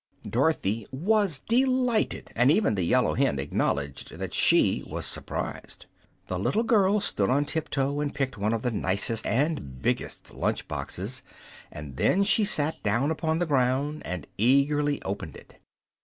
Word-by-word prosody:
Dorothy 115 -5 0
was 190 +3 +1
delighted, 250 - +1
and 125 +3 +4
even 170 - +2
the 100 - -1
yellow 85 - +2
hen 70 - +1
acknowledged 70 0 -2
that - - -5
she - - +3
was - - -5
surprised. - - -4 0.4
The 90 - -3
little 210 - +1
girl 210 -3 +3
stood 100 - 0
on 140 +3 +2
tip 160 +1 -3
toe 140 +1 -1
and 145 -1 -1
picked 135 -1 -2
one 105 +1 -1
of 115 -1 -2
the 125 - 0
nicest 105 +2 0
and 125 - -1
biggest - - -3
lunch - - -2
boxes, - - -4 0.5
and 75 -4 -9
then 200 - +3
she 210 +1 +4
sat 155 -6 +1
down 115 +8 +1
upon 160 0 -1
the 175 - 0
ground 140 +1 0
and 90 -5 -5
eagerly 145 +5 +3
opened 95 -6 -5
it. - - -18
140 Hz, 155 wpm, -27 LUFS, 105-160 Hz, 0.5 s, and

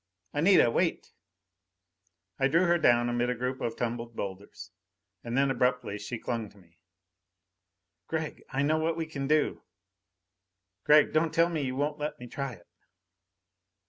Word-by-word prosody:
"Anita, 155 -5 +5
wait!" - - -1 1.3
I 135 - +4
drew 165 +6 +3
her 175 0 +3
down 120 -5 +4
amid 120 0 0
a 125 - 0
group 125 +2 -3
of 115 -1 -2
tumbled 115 -1 -4
boulders. 100 0 -7 0.5
And 120 +1 -3
then 135 0 +3
abruptly 125 -4 0
she 105 +3 -5
clung 115 -2 -4
to 100 - -22
me. 85 -3 -23 1.3
"Gregg, 160 -2 -4
I 140 +1 -1
know 155 +2 +2
what 165 +1 0
we 165 - -2
can 140 -4 -5
do! 155 +1 +1 1.2
Gregg, 150 0 +5
don't 155 +1 +2
tell 170 +1 +3
me 160 -3 -2
you 130 -2 -2
won't 145 +2 -1
let 150 0 -4
me 125 - -8
try 135 +1 -5
it!" 85 -5 -16
135 Hz, 155 wpm, -29 LUFS, 120-155 Hz, 1.3 s, Anita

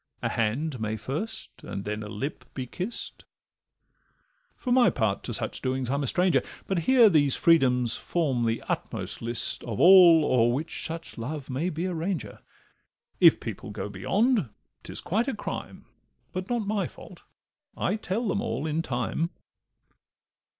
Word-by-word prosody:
A - - +1
hand 125 +5 -1
may 110 0 -2
first, 140 - -6
and 100 - -6
then 105 +1 -3
a 105 - -6
lip 130 +6 -5
be 130 - -3
kist; 185 - -6 1.3
For 250 - -4
my 245 -3 +6
part, 110 - 0
to - - -3
such - - -2
doings 130 -1 -1
I'm 140 +1 0
a 140 - -1
stranger, 180 +6 +2 0.2
But 190 -3 0
hear 250 -4 +7
these 145 -8 +4
freedoms 125 -8 +3
form 135 -9 0
the 115 0 -1
utmost - - -4
list 115 +1 -1
Of 115 -4 -5
all 175 -4 +8
o'er 120 -3 +3
which 145 +7 -2
such 165 -5 -7
love 135 +3 -5
may 150 +8 -1
be 165 +1 -3
a 185 - -2
ranger: 165 - -3 0.8
If - - +7
people - - -6
go - - -5
beyond, 195 - +1 0.3
'tis - - -2
quite 225 +8 0
a 270 - -1
crime, - - -6 0.5
But 185 +1 -4
not 240 -3 -1
my 205 0 0
fault—I - - -7
tell 220 +3 -2
them 200 - 0
all 115 +7 -3
in 160 +1 0
time. 130 +4 -2
155 Hz, 155 wpm, -27 LUFS, 120-185 Hz, 1.3 s, all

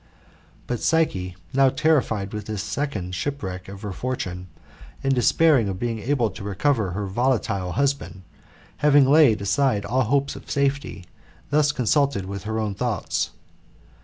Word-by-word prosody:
But 120 -2 -3
Psyche, 95 - 0 0.2
now 135 0 +5
terrified 130 -10 +1
with 105 -1 -5
this 105 -2 -3
second 105 -9 -3
shipwreck 95 -5 -4
of 100 +1 -10
her 105 - -4
fortune, 90 -6 -4 0.6
and 135 0 +2
despairing 130 -1 +3
of 95 - -3
being 115 +1 -2
able 120 -2 0
to 100 - -9
recover 105 0 0
her 100 +2 -3
volatile 100 -4 0
husband, 140 -7 -1 0.5
having 145 -2 +5
laid 135 -8 +5
aside 110 0 +1
all 130 +5 +1
hope 140 +4 +1
of - - -12
safety, 140 -9 -1 0.5
thus 145 -1 +3
consulted 135 -4 +1
with 100 +1 -6
her 110 0 -2
own 110 -2 -1
thoughts. 110 -1 -2
115 Hz, 145 wpm, -23 LUFS, 100-140 Hz, 0.6 s, now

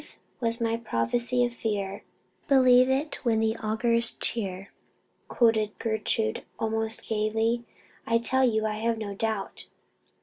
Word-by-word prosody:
"Sooth - - -17 0.2
was 230 -1 -1
my 230 0 0
prophecy 235 - +1
of 240 - -4
fear 200 -4 -3 0.4
Believe 255 -2 +6
it 280 +4 -1
when 225 -3 +2
it 225 +1 -1
augurs 230 +2 +2
cheer," 195 -4 -4 0.6
quoted 220 -3 +2
Gertrude, 215 - -1 0.2
almost 225 0 -2
gaily. 225 +2 0 0.4
"I 230 - +3
tell 250 +3 +2
you 220 -3 +2
I 215 0 -2
have 230 +1 0
no 210 -2 -5
doubt." 215 -1 -3
225 Hz, 135 wpm, -27 LUFS, 215-235 Hz, 0.6 s, Believe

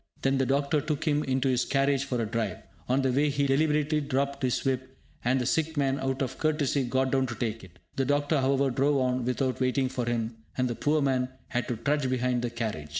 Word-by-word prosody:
Then 135 0 +2
the 135 - +1
doctor 140 +2 +1
took 155 +2 -3
him 150 0 +2
into 130 0 +1
his 125 -1 +2
carriage 135 0 +1
for 125 -3 -2
a 115 - 0
drive. 110 -3 -2 0.3
On 130 +2 +2
the 130 - +2
way 145 +4 +2
he 140 0 0
deliberately 150 +2 +2
dropped 140 0 -1
his 130 0 0
whip, 130 0 -2 0.3
and 130 +2 +2
the 125 - -1
sick 160 +3 0
man, 135 -1 +1
out 135 0 -1
of 130 - -5
courtesy, 150 -3 +1
got 130 +1 0
down 130 -1 +2
to 120 - -5
take 115 -1 -3
it. 90 -1 -15 0.2
The 135 - +1
doctor, 145 +1 +1
however, 135 0 +2
drove 140 +3 +2
on 125 -1 0
without 130 +1 -1
waiting 130 +1 +1
for 125 -2 -2
him, 115 -1 -2 0.2
and 125 -1 +2
the 120 - -2
poor 145 +6 +1
man 130 -2 +1 0.2
had 125 -1 -1
to 120 - -2
trudge 145 0 0
behind 125 -1 0
the 120 - -1
carriage. 110 -11 -4
135 Hz, 230 wpm, -28 LUFS, 125-140 Hz, 0.3 s, Then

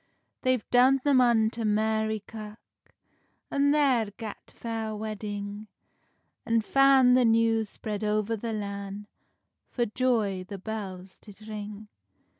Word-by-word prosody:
They've 255 -3 0
done 255 +2 +5
them 280 -3 +4
unto 230 -1 +2
Mary 220 0 0
kirk, 215 -1 -9 0.9
An 280 0 +2
there 270 -7 +3
gat 220 -3 -8
fair 225 -2 -4
wedding, 210 -1 -5 0.8
An 230 0 +2
fan 270 +1 +5
the 255 0 +5
news 225 -1 +3
spread 210 0 -5
oer 210 0 +1
the 225 +2 -4
lan, 200 -1 -5 0.6
For 240 - 0
joy 215 -5 0
the 195 +2 -8
bells 190 -2 -7
did 215 0 -14
ring. 210 0 -7
220 Hz, 120 wpm, -27 LUFS, 210-240 Hz, 0.9 s, done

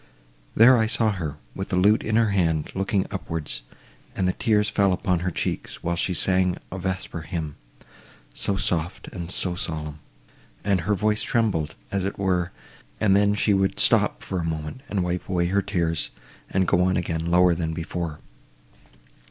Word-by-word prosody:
There 120 +2 +7
I 110 - +2
saw 110 0 +2
her, 85 -8 -4 0.2
with 95 - -5
the 95 - 0
lute 100 +4 +4
in 110 - -1
her 115 -2 +3
hand, 80 -6 +1
looking 95 0 0
upwards, 80 -6 -3 0.5
and 95 - +1
the 90 - +1
tears 105 -2 +2
fell 100 -3 +2
upon 90 -1 0
her 90 +2 -1
cheeks, 85 - -3
while 85 +1 0
she 90 +1 0
sung 90 0 +2
a 95 - -5
vesper 90 -2 -3
hymn, 80 -2 -4 0.8
so 100 - 0
soft, 85 -1 -1
and 85 -3 -6
so 90 -1 +1
solemn! 75 -3 -4 0.6
and 100 -3 +2
her 105 +5 +1
voice 105 +2 +1
trembled, 100 -10 0 0.2
as 100 -1 0
it 100 - -3
were, 90 -2 0 0.5
and 100 -3 +4
then 100 0 +4
she 105 0 +2
would 95 0 +1
stop - - +3
for 95 - -3
a - - -2
moment, 80 +7 -4
and 95 -3 0
wipe 90 0 -3
away 90 -2 +1
her 100 +3 +2
tears, 85 -6 -1 0.4
and 95 -1 +1
go 90 - +3
on 95 +1 +2
again, 80 -1 -2
lower 90 +1 +5
than 80 -1 -2
before. 85 -1 -4
90 Hz, 175 wpm, -24 LUFS, 85-100 Hz, 0.8 s, There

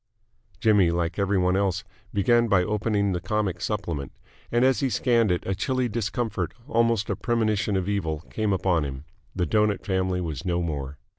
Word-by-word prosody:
Jimmy, 105 -6 +4
like 85 +1 -1
every 100 0 +2
one 90 0 +2
else, 95 -2 0 0.3
began 115 +4 +3
by 95 -4 +4
opening 105 0 0
the 90 -1 -2
comic 100 -4 -1
supplement: 85 -10 -3 0.4
and 120 +2 +3
as 130 0 +3
he 135 - +1
scanned 115 -4 +2
it 90 - -1
a 95 - 0
chilly 125 +6 0
discomfort, 105 -4 -2
almost 115 -4 +2
a - - 0
premonition 110 -1 0
of 95 -1 -2
evil, 80 -7 -1
came 110 -2 0
upon 90 -4 +1
him. 70 0 -6 0.3
The 90 -2 +1
Doughnut 105 -2 +1
Family 95 -2 0
was 80 -2 -4
no 90 -1 0
more. 70 -4 -4
100 Hz, 175 wpm, -25 LUFS, 90-110 Hz, 0.4 s, Jimmy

